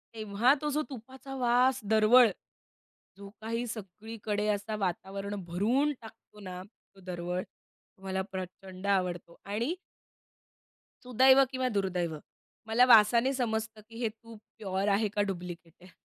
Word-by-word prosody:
तेव्हा 215 +4 +2
तो 300 - -1
जो 300 +1 0
तुपाचा 265 +2 -9
वास 250 +1 +3
दरवळ. 225 +3 +7 0.9
जो 200 0 -10
काही 230 +2 -2
सगळीकडे 210 0 -4
असा 210 +1 -1
वातावरण 195 +2 -3
भरून 235 - +1
टाकतो 220 -1 -15
ना, 185 -2 -7 0.3
तो 195 - -17
दरवळ. 180 0 -3
तो - - -31
मला 190 0 -2
प्रचंड 185 +1 -7
आवडतो 180 -3 -1
आणि 225 +10 -1 1.3
सुदैव 260 +2 +6
किंवा 255 -1 -1
दुर्दैव. 180 -7 -1 0.5
मला 235 +3 +5
वासाने 235 +2 +6
समजतं 220 -3 -2
की 230 0 -10
हे 230 - +2
तूप 225 0 -14 0.2
प्युअर 195 -1 -2
आहे 205 +2 +2
का 205 +1 0
डुप्लिकेट 175 -2 -7
आहे. 185 - -14
215 Hz, 130 wpm, -30 LUFS, 190-240 Hz, 1.3 s, दरवळ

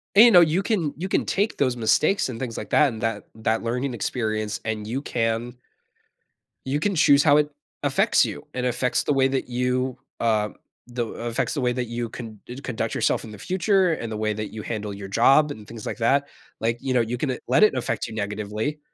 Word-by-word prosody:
And 215 +4 +10
you 240 - +7
know, 180 -4 +8
you 170 +4 +2
can 185 -10 0
you 180 +4 -3
can - - +1
take 205 +3 0
those 130 -3 +1
mistakes 145 - +2
and 115 -3 -6
things, 115 -3 -4
like, - - -6
that, 150 - +5
and 110 -1 -8
that, 115 - -2
that 110 0 -1
learning 125 +3 -2
experience, 110 -2 -2
and 110 -1 -3
you 125 +5 -2
can 115 -1 -2 1.1
you 135 +2 0
can 200 +4 0
choose 145 -3 +5
how 145 -2 +6
it 150 0 +2 0.3
affects - - +3
you. - - -6
It 125 0 -2
affects 125 0 0
the 145 - +1
way 135 -1 +3
that 135 0 -2
you, 125 +1 -1 0.2
uh, 110 -2 +1 0.4
the 120 -1 -2
affects 115 +1 -3
the 145 - -2
way 125 -1 +2
that 125 0 -2
you 120 0 -4
con 110 -3 -9
d 125 - -8
conduct 115 -4 -3
yourself - - +1
in 110 - -9
the 105 - -9
future, 185 - +2
and 115 -7 -5
the 110 - -3
way 110 0 0
that 105 0 -5
you 110 - -5
handle 105 -2 -4
your 100 0 -7
job 140 +9 +4
and 105 -6 -9
things 115 -2 -9
like - - -4
that. 140 +4 +2 0.3
Like, 115 +1 0
you 135 -1 -1
know, 125 - +4
you 115 +2 -2
can, 135 +2 -1
uh, 125 - -3
let 130 - +4
it 215 - +5
affect 125 - -2
you 115 - -8
negatively, 105 +6 -3
125 Hz, 230 wpm, -24 LUFS, 110-140 Hz, 1.1 s, And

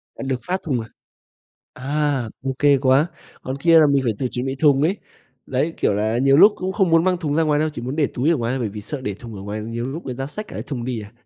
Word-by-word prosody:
À, - - -7
được 130 -2 -1
phát 185 +1 -2
thùng, 135 -6 -1
à, 110 - -9 0.9
à, 140 -2 -1 0.2
OK 135 +1 +3
quá, 135 +3 +4 0.4
còn 130 +1 -4
kia 165 +3 +5
là 155 - +6
mình 140 -1 +2
phải 115 - +1
tự 130 - -1
chuẩn 125 +2 -3
bị 135 - -2
thùng 140 -1 +3
ấy. 180 +7 +2 0.5
Đấy, 150 +6 -1
kiểu - - +1
là, 110 +3 0
nhiều 135 +2 +4
lúc 205 +6 +8
cũng 190 0 -3
không 190 -4 +1
muốn 165 0 +4
mang 185 -1 +2
thùng 155 -4 -2
ra 165 - +3
ngoài 150 -1 +2
đâu, 155 - +1
chỉ 120 - -7
muốn 130 +5 -4
để 150 - +3
túi 135 +6 +1
ở 170 - +3
ngoài 115 -1 -2
thôi, 135 - -1
bởi 120 -4 -1
vì 105 +1 -7
sợ 140 +7 -6
để 105 -6 -3
thùng 115 +2 -10
ở 95 - -8
ngoài 105 +2 -5
nhiều 115 +2 -4
lúc 155 +6 -6
người 130 - -4
ta 135 +2 -4
xách 210 +9 -6
cả - - -10
cái - - -4
thùng 125 -5 -5
đi 125 -3 -3
à. 105 +1 -12
135 Hz, 295 wpm, -21 LUFS, 120-155 Hz, 0.9 s, lúc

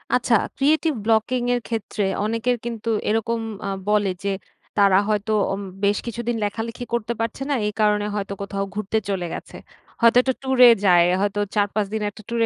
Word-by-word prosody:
আচ্ছা, 245 -1 +2 0.2
creative 310 +3 +2
blocking 230 +3 +2
এর 245 - -2
ক্ষেত্রে, 220 -2 -2 0.2
অনেকের 230 +3 0
কিন্তু 230 -1 -4 0.2
এরকম 225 +2 0 0.3
আ - - -1 0.2
বলে 205 -2 +2
যে, 200 - 0 0.5
তারা 200 -2 +5
হয়তো 210 +1 0 0.2
অম 195 - -4 0.2
বেশ 200 +1 +3
কিছুদিন 235 0 -3
লেখালেখি 225 +4 -4
করতে 235 0 -1
পারছে 230 +3 -3
না। - - +2
এই 210 - -3
কারণে 210 -1 +2
হয়তো, 200 -1 -3
কোথাও 200 0 -3
ঘুরতে 210 +1 -1
চলে 190 -3 -1
গেছে। - - -8 0.4
হয়তো 235 +1 +6
একটা 260 +1 0
ট্যুরে 260 -2 +7 0.2
যায়, 175 -2 +6 0.2
হয়তো 205 0 0 0.2
৪-৫ 205 0 +1
দিন 220 - -1
একটা 205 - -13
ট্যুর 235 0 -1
220 Hz, 175 wpm, -22 LUFS, 205-235 Hz, 0.5 s, ট্যুরে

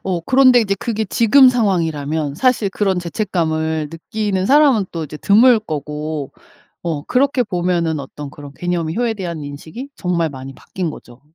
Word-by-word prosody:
어 180 -3 -1
그런데 255 +4 +5
이제 200 -3 0
그게 220 -2 -2
지금 250 +6 +5
상황이라면 160 - 0
사실 250 -6 +2
그런 195 -3 0
죄책감을 160 -4 -2
느끼는 190 +3 -2
사람은 275 -8 +4
또 165 -2 -3
이제 150 +1 -8
드물 225 +7 +5
거고 150 -4 -5 0.5
어 160 -4 -3
그렇게 260 0 +1
보면은 175 -5 -1
어떤 140 +1 -8
그런 145 -2 -11
개념이 170 -1 -2
효에 240 -2 0
대한 170 -7 -5
인식이 160 - -8
정말 170 -3 -1
많이 135 0 -9
바뀐 180 -4 -5
거죠. 120 -4 -12
175 Hz, 345 characters per minute, -18 LUFS, 155-220 Hz, 0.5 s, 그런데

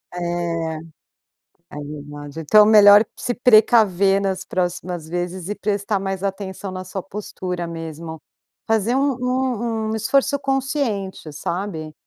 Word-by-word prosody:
É 170 -2 -2 1.0
é 150 - -7
verdade. 145 0 -8
Então 210 +7 +6
melhor 210 -1 +8
se 245 - -3
precaver 215 -5 +4
nas 190 -1 -2
próximas 180 -2 -3
vezes 175 +1 -4
e 205 - -2
prestar 205 0 -1
mais 195 -1 -3
atenção 195 0 -4
na 185 0 -6
sua 185 +1 -5
postura 185 -3 -5
mesmo, 165 -1 -7 0.5
fazer 225 +1 +1
um 275 0 +1
um 240 -3 -1
um - - -1
esforço 275 +6 +1
consciente, 270 - -2
sabe? 160 0 -4
195 Hz, 125 wpm, -21 LUFS, 175-220 Hz, 1.0 s, melhor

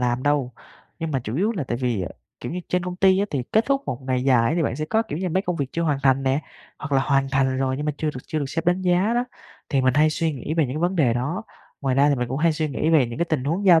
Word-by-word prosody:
làm 125 0 0
đâu 145 -3 +1 0.5
nhưng 165 -1 -3
mà 135 -3 0
chủ 110 +4 -3
yếu 205 +7 +1
là 180 -10 -3
tại 120 - -2
vì, 120 -5 -1
à, 85 - -3 0.3
kiểu - - -5
như, 180 - -3
trên 180 0 0
công 180 0 -4
ty 190 0 +4
á 200 - +2
thì 135 -3 -1
kết 220 +1 +4
thúc 275 0 +1
một 125 +2 -4
ngày 130 -1 -1
dài 120 -4 +4
á - - +1
thì 165 - +2
bạn 125 - -1
sẽ 155 - -2
có, 220 +8 +1
kiểu 170 -8 -5
như, 185 -1 -1
mấy 190 +3 0
công 180 -3 -2
việc 140 - -1
chưa 170 - -1
hoàn 150 -4 +1
thành 135 0 +3
nè 135 +2 +1 0.4
hoặc 155 - -6
là 135 - +4
hoàn 135 -1 +2
thành 130 -1 +1
rồi 130 -1 0
nhưng 150 +2 -3
mà 150 - +1
chưa 155 - 0
được 125 - -6
chưa 155 - -2
được 145 - -1
sếp 165 +4 -3
đánh 180 +2 +2
giá 185 +5 +2
đó, 240 +1 +1 0.4
thì 140 - +2
mình 130 -1 +2
hay 155 +2 +4
suy 160 +1 0
nghĩ 145 +3 -4
về 165 -2 +3
những 130 - -5
cái - - -1
vấn 180 +2 0
đề 130 -8 +3
đó. 145 - -2 0.4
Ngoài 135 -2 0
ra 140 +2 +4
thì 145 - +3
mình 125 -2 -2
cũng 130 +3 -2
hay 165 +1 +3
suy 155 0 -1
nghĩ 150 +3 0
về 145 -7 +5
những 120 +5 -7
cái 170 - +2
tình 145 -5 0
huống 170 +8 -1
giao 170 -3 +7
150 Hz, 330 wpm, -23 LUFS, 130-175 Hz, 0.5 s, giao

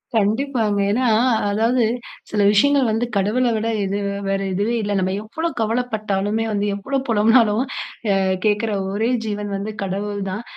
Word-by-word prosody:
கண்டிப்பாங்க. 220 0 +1
ஏன்னா, 250 +4 +1 0.4
அதாவது 230 +4 +2 0.5
சில 210 - 0
விஷயங்கள் 270 +4 +4
வந்து 225 +3 0
கடவுள 215 +6 +1
விட 220 +1 -1 0.2
இது 195 +1 -1 0.3
வேற 195 - +1
எதுவே 205 +5 0
இல்லங்க. 205 -2 0
நம்ப 185 0 0
எவ்வளவு 320 +9 -4
கவல 225 +3 +1
பட்டாலுமே, 210 +1 -1
வந்து 205 -1 0
எவ்ளோ 270 +8 -2
புலம்பினாலும் 225 +1 +4 0.5
அ - - +3 0.3
கேட்குற 215 +1 +1 0.2
ஒரே 220 +4 0 0.2
ஜீவன் 210 -1 -3
வந்து 205 +2 -4
கடவுள் 200 +2 -3
தான். 210 +5 -4
215 Hz, 150 wpm, -21 LUFS, 205-230 Hz, 0.5 s, விஷயங்கள்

